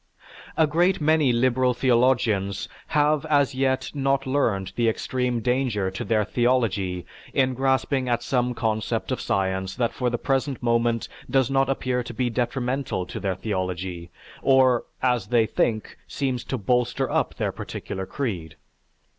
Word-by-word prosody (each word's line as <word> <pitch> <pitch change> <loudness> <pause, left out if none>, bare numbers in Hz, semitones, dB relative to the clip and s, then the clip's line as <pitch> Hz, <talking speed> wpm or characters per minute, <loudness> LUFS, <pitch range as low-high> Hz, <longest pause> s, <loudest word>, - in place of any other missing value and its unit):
A 160 - +5
great 175 +5 +2
many 155 -3 +3
liberal 125 +1 +2
theologians 120 -6 +2 0.2
have 150 0 +2
as 145 -2 +3
yet 130 0 0
not 135 -1 0
learned 115 -9 0
the 120 -1 +2
extreme 125 +1 -1
danger 125 -6 0
to 95 - -5
their 105 0 +1
theology 105 -7 0 0.3
in 130 -1 +3
grasping 130 0 +1
at 120 0 0
some 125 -1 0
concept 110 -2 -1
of - - -1
science 95 0 -1
that 120 -2 0
for 125 -1 0
the 120 - -1
present 135 0 -1
moment 115 -1 +1 0.2
does 130 0 +2
not 135 -1 +2
appear 130 -2 0
to 120 -1 -8
be 125 -1 0
detrimental 125 -3 -1
to - - -6
their 95 -2 -1
theology, 90 -3 -3 0.3
or, 130 -3 +4 0.2
as 125 -6 +1
they 115 0 +3
think, 110 0 -1
seems 130 -3 -2
to 130 - -2
bolster 125 +3 +1
up - - 0
their - - -1
particular 95 0 -6
creed. 90 - -4
125 Hz, 150 wpm, -24 LUFS, 110-135 Hz, 0.3 s, A